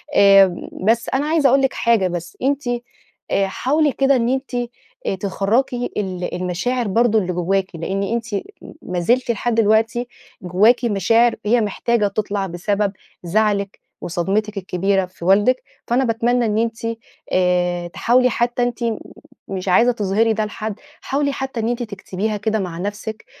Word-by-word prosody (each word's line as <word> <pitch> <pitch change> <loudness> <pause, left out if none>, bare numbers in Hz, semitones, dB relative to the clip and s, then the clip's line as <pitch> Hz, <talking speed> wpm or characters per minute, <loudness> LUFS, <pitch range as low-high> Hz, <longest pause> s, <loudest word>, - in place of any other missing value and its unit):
آمم، 195 -3 +5 0.2
بس 230 +2 +2
أنا 270 +2 +1
عايزة 305 -3 +3
أقول 270 +2 +4
لِك 270 0 +1
حاجة 230 -5 +2
بس، 175 -1 -6
أنتِ 280 +2 0 0.7
آآ 195 - +2
حاولي 290 +9 +1
كده 275 +1 +3
إن 240 -1 +1
أنتِ 265 +1 -2 0.7
تخَرَّجي 230 +6 0
ال 185 -3 -3
المشاعر 185 +7 -1
برضه 225 +2 +3
اللي 180 -3 -2
جواكِ، 185 +2 0
لأن 190 +4 -2
أنتِ 230 +3 -2 0.6
ما 180 -1 -3
زلتِ 240 +7 +2
لحد 235 +1 -1
دلوقتي 225 +2 +2 0.3
جواكِ 210 +8 +3
مشاعر 230 +3 +3
هي 235 +3 +3
محتاجة 215 +1 0
تطلع 200 -1 -2
بسبب 200 +3 -1 0.3
زعلِك 200 +2 0 0.2
وصدمتِك 200 +5 -1
الكبيرة 190 +1 0
في 180 -2 -11
والدِك، 210 +8 +3 0.2
فأنا 245 +3 +2
باتمنى 240 +1 +1
إن 215 -1 0
أنتِ 225 0 0 0.5
آآ 180 -1 +1
تحاولي 250 +8 +2
حتى 240 +1 0
أنتِ 245 -1 -2 0.7
مش 190 -1 -5
عايزة 235 +7 +5
تظهري 220 0 +1
ده 215 0 -1
لحد، 215 0 -5 0.2
حاولي 280 +1 0
حتى 265 -3 -4
إن 225 +1 0
أنتِ 240 0 -2
تكتبيها 210 0 -4
كده 220 +1 -1
مع 180 -4 -4
نفسِك، 210 +4 -5
215 Hz, 150 wpm, -20 LUFS, 195-240 Hz, 0.7 s, آمم